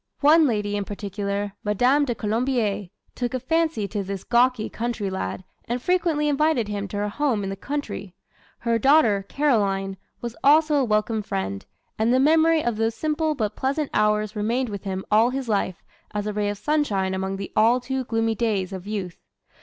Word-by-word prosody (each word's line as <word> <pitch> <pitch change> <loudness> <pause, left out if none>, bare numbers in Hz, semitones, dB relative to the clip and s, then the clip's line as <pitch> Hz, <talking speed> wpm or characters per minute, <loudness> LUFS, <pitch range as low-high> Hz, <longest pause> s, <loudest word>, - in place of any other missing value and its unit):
One 305 +2 +6
lady 210 -4 -1
in 205 - -1
particular, 200 0 -4
Madame 250 +8 +3
de 240 -3 -2
Colombier, 220 -2 -1 0.3
took 245 0 -3
a - - -1
fancy 315 -5 0
to 205 -1 -2
this 195 -1 -5
gawky 240 -1 +2
country 230 -4 -3
lad 185 - -4 0.2
and 240 +2 -2
frequently 330 -1 +1
invited 295 -5 +2
him 205 -1 -3
to 205 - -5
her 205 0 0
home 245 -3 0
in 195 - -3
the - - -3
country. 200 -6 -5 0.4
Her 230 -1 0
daughter, 230 -7 +4
Caroline, 195 -9 +1 0.2
was 235 -1 -5
also 305 +2 +5
a 275 - +3
welcome 215 -1 +1
friend, 95 - -4 0.3
and 220 +2 +3
the 255 - +4
memory 320 +2 +4
of 235 -3 -1
those 225 0 0
simple 310 +1 0
but 215 -5 -2
pleasant 275 +2 -1
hours 210 0 +1
remained 235 +4 0
with 200 0 -6
him 190 -1 -3
all 220 +3 +5
his 265 0 -3
life 200 -4 -1 0.3
as 205 0 -1
a 210 - -2
ray 205 0 0
of 205 - -3
sunshine 205 -9 0
among 190 +1 -2
the 195 - -6
all 230 +4 +4
too 260 +1 -3
gloomy 225 -1 0
days 205 -4 -1
of 190 +1 -7
youth. 195 -5 -5
220 Hz, 185 wpm, -24 LUFS, 200-265 Hz, 0.4 s, One